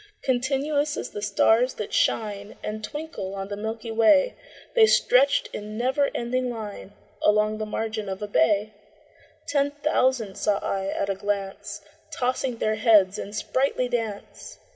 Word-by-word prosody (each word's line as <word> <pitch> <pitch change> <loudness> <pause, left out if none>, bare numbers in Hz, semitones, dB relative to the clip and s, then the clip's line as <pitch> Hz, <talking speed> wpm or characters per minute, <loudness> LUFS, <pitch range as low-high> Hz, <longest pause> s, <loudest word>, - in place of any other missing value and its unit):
Continuous 280 +3 0
as - - -5
the 205 - -6
stars 220 +4 +3
that 210 - -6
shine 205 -1 0
And 215 0 -4
twinkle 295 - -5
on 195 0 -5
the 205 - -3
milky 220 +2 -5
way, 230 - +4 0.4
The 450 -2 +6
stretched 275 -7 +4
in 210 +1 -6
never 260 +4 +1
ending 250 +1 -1
line 210 -4 -7 0.3
Along 215 +1 +2
the 215 - -3
margin 215 -1 -3
of 190 0 -4
a - - -3
bay: 205 +3 +2 0.7
Ten 285 -1 +2
thousand 260 -8 0
saw 205 -1 +2
I 195 -1 -2
at 195 0 -1
a - - +1
glance, 200 0 -4 0.3
Tossing 255 -1 -1
their 215 -1 0
heads 205 -5 +4
in 200 - -6
sprightly 255 +4 0
dance. 235 - -5
220 Hz, 150 wpm, -25 LUFS, 205-255 Hz, 0.7 s, The